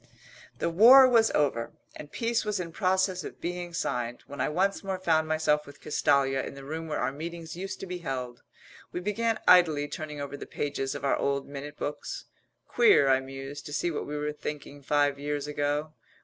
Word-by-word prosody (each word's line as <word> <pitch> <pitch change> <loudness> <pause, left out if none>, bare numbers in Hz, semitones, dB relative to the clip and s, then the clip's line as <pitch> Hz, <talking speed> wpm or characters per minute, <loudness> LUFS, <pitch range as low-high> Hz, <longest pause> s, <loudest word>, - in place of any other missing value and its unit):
The - - -1
war 250 +9 +9
was 230 -3 +4
over 125 -6 0 0.2
and 150 - -10
peace 230 0 0
was 210 -2 -1
in 170 -2 -4
process 185 -1 +1
of - - -9
being 175 0 -4
signed, 120 -7 -3
when 140 - -6
I - - +1
once 190 +7 0
more 190 -1 -2
found 160 -3 +1
myself 155 -1 +1
with 145 0 -13
Castalia 135 -2 +2
in - - -7
the 140 - -10
room 160 +3 -5
where 155 - -2
our - - 0
meetings 165 +2 -7
used 190 +2 -5
to - - -4
be 180 -1 -5
held. 125 -6 -5 0.5
We - - -3
began 220 +4 -1
idly 160 -5 +5
turning 150 0 -6
over 145 0 -5
the - - -8
pages 135 -2 -3
of 140 - -5
our 140 - +2
old 140 0 -1
minute 145 +1 -8
books. 145 - -5 0.4
"Queer," 425 - +5
I 130 0 +5
mused, 135 +3 -8
"to 145 - -7
see 170 +4 0
what 155 - -4
we 150 +1 -4
were 150 0 -2
thinking 145 -1 -7
five 145 0 +1
years 145 0 -2
ago." 150 +1 -2
150 Hz, 200 wpm, -28 LUFS, 140-180 Hz, 0.5 s, war